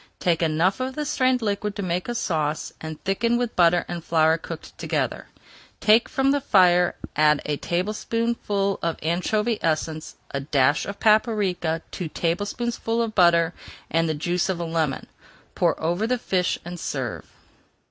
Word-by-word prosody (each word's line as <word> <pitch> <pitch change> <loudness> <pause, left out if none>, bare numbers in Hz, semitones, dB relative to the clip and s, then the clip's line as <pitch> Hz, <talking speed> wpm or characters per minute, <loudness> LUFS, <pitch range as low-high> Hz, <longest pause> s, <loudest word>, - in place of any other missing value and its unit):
Take 170 -2 +1
enough 165 +4 +1
of 260 +1 -3
the 300 - -2
strained 255 -3 +1
liquid 205 0 -2
to 200 - -4
make 180 +3 -2
a 240 - -2
sauce, 155 -7 -1
and 155 -1 -6
thicken 230 +5 +1
with 245 -1 -2
butter 175 0 +4
and 175 -2 -5
flour 160 -1 +3
cooked - - -9
together. - - -2 0.5
Take 220 +2 +4
from 270 0 +2
the 285 0 +1
fire, 180 -7 +4 0.2
add 150 -1 +4
a 150 -1 -1
tablespoonful 205 +2 -1
of 165 -1 -1
anchovy 210 +7 0
essence, 155 -1 -2 0.2
a 140 - -2
dash 140 0 +2
of 200 0 -6
paprika, 205 -7 +2
two 180 - -4
tablespoonfuls 225 +8 -1
of 220 - -7
butter, 170 -3 +4 0.4
and 165 0 +2
the 155 - 0
juice 175 +5 -1
of 185 -2 -1
a 170 - -2
lemon. 160 -4 -1 0.5
Pour - - +1
over 175 +7 0
the 250 +1 +1
fish 185 -6 0
and 175 0 -7
serve. 130 -7 -4
180 Hz, 160 wpm, -24 LUFS, 160-215 Hz, 0.5 s, butter